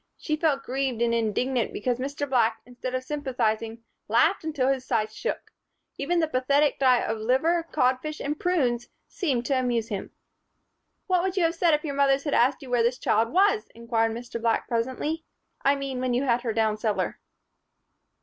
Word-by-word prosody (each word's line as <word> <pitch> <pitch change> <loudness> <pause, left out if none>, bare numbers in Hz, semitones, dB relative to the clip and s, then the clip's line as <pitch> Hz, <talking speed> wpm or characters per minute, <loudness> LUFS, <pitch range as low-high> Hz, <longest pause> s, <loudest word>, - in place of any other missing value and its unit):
She 305 - -2
felt 300 -3 +1
grieved 260 -2 -2
and 235 0 +1
indignant 235 +2 0
because 245 +3 -2
Mr. 280 +2 -3
Black, 230 -4 +2
instead 250 +1 -5
of 255 - -2
sympathizing, 235 -5 -2 0.2
laughed 315 - +3
until 295 -5 0
his 270 -2 0
sides 215 -3 -1
shook. 470 - -4 0.5
Even 340 +5 +1
the 320 - +2
pathetic 280 +1 +2
diet 255 -3 +4
of 220 0 -2
liver, 320 +9 +1
codfish 255 +5 0
and 295 +2 -3
prunes 250 -10 0 0.2
seemed 265 - -1
to 270 -1 +1
amuse 240 -3 -1
him. 200 -2 -4 1.0
"What 365 -2 +2
would 380 +1 -2
you 365 - +3
have 330 0 +2
said 335 -2 +3
if 300 - -4
your 285 - -2
mothers 275 0 +3
had 290 - -2
asked 260 +4 +3
you 255 - -9
where 245 -1 +3
this 240 +2 +1
child 225 -1 +1
was?" 405 +4 +3
inquired 230 -1 0
Mr. 235 0 -6
Black 230 -1 +1
presently. 260 +7 -2 0.4
"I 275 +1 +3
mean, 275 -2 -4
when 255 -1 0
you 255 - +1
had 240 -3 +2
her 240 -2 -2
down 220 -1 +1
cellar?" 215 -1 -1
255 Hz, 185 wpm, -26 LUFS, 235-295 Hz, 1.0 s, diet